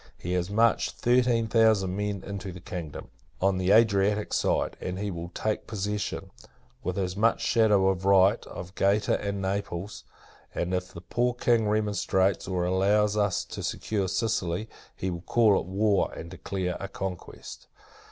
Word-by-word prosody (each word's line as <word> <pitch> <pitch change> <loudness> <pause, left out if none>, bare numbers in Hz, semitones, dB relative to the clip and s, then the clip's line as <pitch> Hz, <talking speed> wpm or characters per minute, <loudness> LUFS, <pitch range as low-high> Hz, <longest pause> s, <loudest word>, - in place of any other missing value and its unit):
He 90 - -4
has 90 0 -1
marched 115 +3 +2
thirteen 120 -1 +2
thousand 110 -4 +3
men 105 -1 -3
into 100 -1 -6
the 90 - -9
kingdom, 90 -5 -7 0.3
on 95 0 +2
the 95 0 0
Adriatic 105 -1 +3
side; - - +1
and 90 0 -4
he 100 +1 -3
will 85 0 -6
take 110 -1 -2
possession, 105 -1 -3 0.5
with 90 - -3
as 90 -2 -1
much 110 +3 +2
shadow 105 -5 +3
of 95 -1 0
right, 100 +2 +4
of 90 +1 -8
Gaeta 100 +2 +1
and 100 -1 -3
Naples: 95 0 -3 0.5
and, 90 +2 -2
if 90 +1 -2
the 85 - -10
poor 120 +6 0
King 120 -3 +2
remonstrates, 100 -3 +1
or 90 -1 -1
allows 100 +3 +2
us 100 -3 +1
to - - -7
secure 100 -3 -2
Sicily, 95 -1 -1 0.3
he 95 - -3
will 85 -1 -5
call 110 +1 +3
it - - -7
war, 100 +1 +1
and 85 0 -8
declare 95 -2 -3
a 100 - -4
conquest. 95 -2 -7
100 Hz, 160 wpm, -27 LUFS, 95-105 Hz, 0.5 s, right